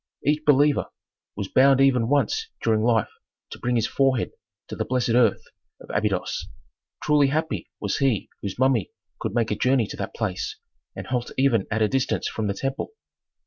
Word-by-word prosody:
Each 150 +2 +2
believer 145 0 +3 0.5
was 100 -1 -4
bound 135 +4 +5
even 130 -4 +4
once 145 - +1 0.2
during 110 -1 +2
life 115 -2 +2 0.4
to - - -8
bring 125 0 0
his 115 - +2
forehead 135 -3 +1 0.4
to - - -5
the - - -1
blessed 125 -1 -1
earth 115 -3 +3 0.4
of - - -11
Abydos. 105 -3 -1 0.6
Truly 150 -2 +4
happy 155 +4 -2
was - - -1
he 135 -7 +1
whose 100 -1 -5
mummy 130 -6 +2 0.3
could 100 - -4
make 115 -2 +1
a - - +1
journey 125 +1 +2
to - - -8
that - - -5
place 100 -5 -3 0.4
and - - -6
halt 125 -2 -2
even 130 -7 +2
at 110 +1 +1
a - - +4
distance 130 +3 0
from 110 -2 -3
the 100 - -1
temple. 135 - -3
125 Hz, 180 wpm, -24 LUFS, 110-135 Hz, 0.6 s, bound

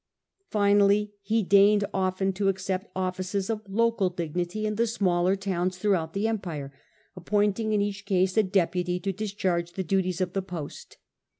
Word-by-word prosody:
Finally 205 0 +3
he 220 +2 +1
deigned 200 +2 +5
often 190 0 0
to 195 +1 -1
accept 190 +1 -1
offices 185 +2 -2
of 215 -1 -3
local 225 -2 +2
dignity 175 +4 -3
in 215 - 0
the 230 +2 +1
smaller 185 -4 +1
towns 185 -2 -2
throughout 180 -5 0
the 200 +3 0
empire, 170 -11 -4 0.4
appointing 205 +4 0
in 210 -1 +2
each 205 0 -5
case 185 -2 +2
a 220 - +6
deputy 180 -2 0
to 195 +1 -2
discharge 185 -4 -2
the 190 - -3
duties 185 0 0
of 185 -1 -1
the 195 - 0
post. 175 -6 -8
195 Hz, 160 wpm, -27 LUFS, 180-205 Hz, 0.4 s, a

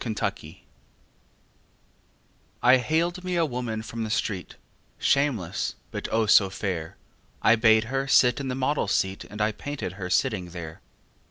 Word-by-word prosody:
My 120 - -4
Madonna 110 - -3 2.1
I 125 +1 +7
haled 170 +7 -1
me 180 -1 -2
a 170 -1 +3
woman 120 -5 -4
from 115 0 -5
the 110 - -4
street, 100 -3 -2 0.4
Shameless, 120 - 0 0.2
but, - - -4
oh, 110 0 +2
so 100 -2 +5
fair! 90 -4 -4 0.5
I 110 - +6
bade 110 -1 +5
her 135 +4 -2
sit 125 -2 +4
in 140 - -4
the 130 - -2
model's 130 -5 0
seat 95 0 -1
And 105 - -10
I 105 +1 +2
painted 140 -2 -5
her 90 - -3
sitting 90 0 0
there. 85 -2 -8
110 Hz, 155 wpm, -26 LUFS, 100-135 Hz, 2.1 s, I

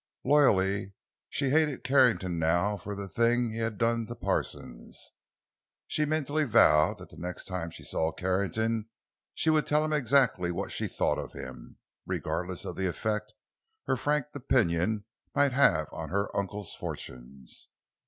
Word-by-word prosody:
Loyally, 100 -9 +3 0.4
she 135 -2 0
hated 150 -2 +2
Carrington 125 -10 +3
now 85 +6 +2
for 100 +1 -6
the 100 0 -5
things 120 +2 +1
he 115 - -4
had 110 -2 -2
done 115 -1 +1
to 120 - -6
Parsons. - - -4 0.7
She 155 - +1
mentally 155 0 0
vowed 75 - +5
that - - -12
the - - -15
next 90 +1 -5
time 90 -3 -4
she - - -10
saw 80 0 0
Carrington 100 +5 -1 0.5
she 160 - +2
would 155 -1 +2
tell 150 +1 +3
him 155 - -1
exactly 125 -10 +3
what 85 - -4
she - - -1
thought - - 0
of - - -7
him, 65 -2 -9 0.3
regardless 90 0 -3
of - - -6
the 95 - 0
effect 105 +4 -3 0.5
her - - +1
frank 145 +3 0
opinion 105 -6 +1 0.3
might 145 -1 +4
have 105 - +3
on 80 -1 -6
her 100 +2 -1
uncle's 100 0 -3
fortunes. 60 +1 -8
105 Hz, 155 wpm, -29 LUFS, 90-130 Hz, 0.7 s, vowed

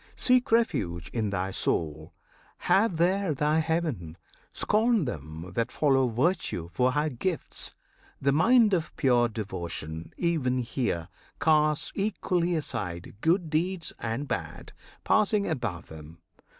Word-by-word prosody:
Seek 250 -2 +2
refuge 90 - +1
in 110 -3 0
thy 95 -1 -2
soul; 80 -4 -1 0.5
have 195 -3 +2
there 180 -1 +2
thy 150 +3 +2
heaven! 155 - -2 0.3
Scorn 220 -3 +2
them 80 - -6
that 115 +2 -1
follow 135 -3 +3
virtue 120 - -1
for 125 0 +2
her 150 +1 +1
gifts! 155 +6 -3 0.4
The 140 - +2
mind 220 - +5
of 165 -4 -1
pure 120 -3 +4
devotion 85 -7 -5
even 155 -8 +1
here 115 - -2 0.3
Casts 155 -1 +2
equally 180 -4 0
aside 100 - -4
good 170 -1 +2
deeds 170 +1 -1
and 120 +5 -3
bad, - - -5 0.3
Passing 210 -1 +3
above 120 - -3
them. 80 +1 -11
140 Hz, 125 wpm, -28 LUFS, -, 0.5 s, mind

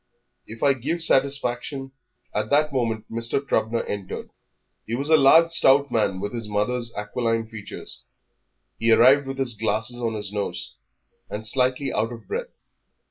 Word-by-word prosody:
If 110 +1 -8
I 140 -1 +5
give 155 +7 -3
satisfaction 135 -1 +1 0.2
" 125 0 -46
At 105 - -2
that 150 +1 +2
moment 115 -4 -1
Mr. 115 +3 -1
Trubner 115 -4 -1
entered. 100 -2 -6 0.6
He 115 - -2
was 140 +5 -1
a - - +8
large, 160 +4 +6
stout 140 -4 +4
man, 105 -5 0
with 105 +3 -4
his 115 -3 -5
mother's 115 +3 0
aquiline 115 +1 -2
features. 110 -2 -10 0.8
He 115 0 +2
arrived 135 +5 +6
with 135 0 -5
his 130 -3 +2
glasses 110 +3 0
on 115 -2 -1
his 105 -2 -5
nose, 100 -4 -4 0.6
and 105 +1 -5
slightly 130 +3 0
out 115 +2 -1
of 115 -1 -10
breath. - - -4
120 Hz, 160 wpm, -24 LUFS, 110-135 Hz, 0.8 s, a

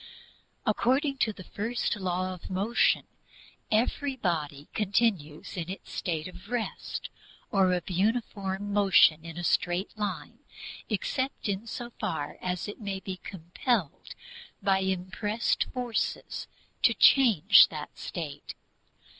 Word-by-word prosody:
According 265 +5 +2
to 220 - +2
the 195 -3 -10
first 230 +6 -2
Law 185 -1 -1
of 180 - -10
Motion, 200 +5 +2 0.7
every 260 +5 +1
body 155 - -2
continues 200 -7 0
in 175 -2 -4
its 190 - -7
state 160 -2 -2
of 185 +3 -12
rest, 240 -2 -3 0.4
or 190 -2 +4
of 180 -2 -1
uniform 200 0 -1
motion 190 -6 +5
in 165 0 -8
a 175 - -4
straight 175 +4 +1
line, 210 -1 -4 0.5
except 260 +5 -2
in 200 +3 -2
so 240 +1 -6
far 160 -8 -3
as 180 +1 -2
it 205 - -8
may 200 -2 -3
be 190 -1 -6
compelled 185 - -2 0.5
by 190 0 +3
impressed 190 +4 0
forces 245 -3 -3 0.3
to - - +5
change 235 - +7
that 150 -2 -7
state. 145 -4 -6
195 Hz, 120 wpm, -29 LUFS, 175-220 Hz, 0.7 s, change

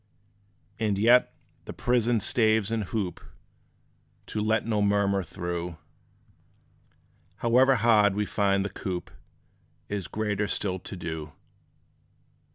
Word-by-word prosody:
And 105 -3 0
yet, 120 +5 +5 0.3
the - - -7
prison 120 -2 +1
staves 110 -3 +2
and 110 -2 -1
hoop 95 -3 -3 1.0
To 105 - -4
let 110 +1 +1
no 110 -2 0
murmur 100 -1 +2
through, 85 -2 -5 1.6
However 130 +3 +4
hard 110 -4 +4
we 105 0 0
find 100 -1 +1
the - - -2
coop, 90 -2 -5 0.8
Is 100 -4 -3
greater 105 -1 -2
still 95 -2 -1
to 95 - -8
do. 80 -4 -6
105 Hz, 110 wpm, -27 LUFS, 95-110 Hz, 1.6 s, yet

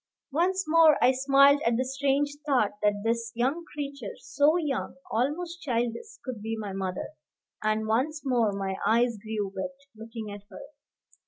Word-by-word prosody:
Once 370 +6 +1
more 315 -1 +6
I 255 - +5
smiled 275 +2 +5
at 230 0 +2
the 255 - 0
strange 275 +2 +1
thought 260 -8 +2
that 205 -1 +1
this 230 0 -1
young 265 +8 0
creature 280 -6 -5
so 290 +4 +2
young, 295 -6 -2 0.2
almost 330 +9 -1
childish 250 - -2
could 250 -5 -5
be 225 +1 -3
my 205 -3 -5
mother; 190 -1 -3 0.5
and 215 0 0
once 275 +8 0
more 240 -5 +2
my 195 -1 -3
eyes 235 -1 +2
grew 210 -2 -4
wet 275 +9 -4 0.2
looking 225 -1 -7
at 205 0 -8
her. - - -10
250 Hz, 160 wpm, -28 LUFS, 220-285 Hz, 0.5 s, more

